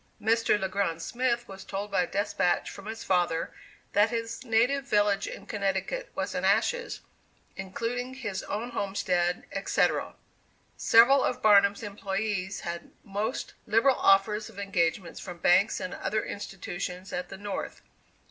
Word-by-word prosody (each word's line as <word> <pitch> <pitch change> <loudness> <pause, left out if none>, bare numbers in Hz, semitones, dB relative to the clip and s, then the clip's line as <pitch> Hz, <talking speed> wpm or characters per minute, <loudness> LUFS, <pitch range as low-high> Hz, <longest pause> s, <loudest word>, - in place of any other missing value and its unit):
Mr. 225 -1 +2
Le 190 - -1
Grand 190 -4 -1
Smith 240 +5 -1
was 195 0 -9
told 200 +1 -5
by 195 - +3
a 175 - 0
despatch 200 -3 0
from 200 - -10
his 225 +1 -6
father 175 -3 +1 0.4
that 205 +2 +4
his 230 +1 -4
native 250 +4 +2
village 205 -6 +2
in - - -8
Connecticut 200 - -2
was - - -2
in - - -2
ashes, 485 0 +1 0.5
including 235 +7 -4
his 205 -8 -4
own 230 +4 -3
homestead, 180 -5 0
etc. - - 0 0.6
Several 250 +4 +6
of 250 - -1
Barnum's 200 -1 +5
employees 200 -1 -3
had 170 0 -5
most 210 +5 -3
liberal 230 +5 +4
offers 210 +2 +3
of 215 - -16
engagements 185 -3 -1
from 180 -2 -7
banks 180 +5 +4
and 185 - -4
other 210 +3 -2
institutions 185 -1 -6
at 180 0 -3
the 195 - -8
North. 205 0 -5
205 Hz, 145 wpm, -28 LUFS, 190-225 Hz, 0.6 s, Several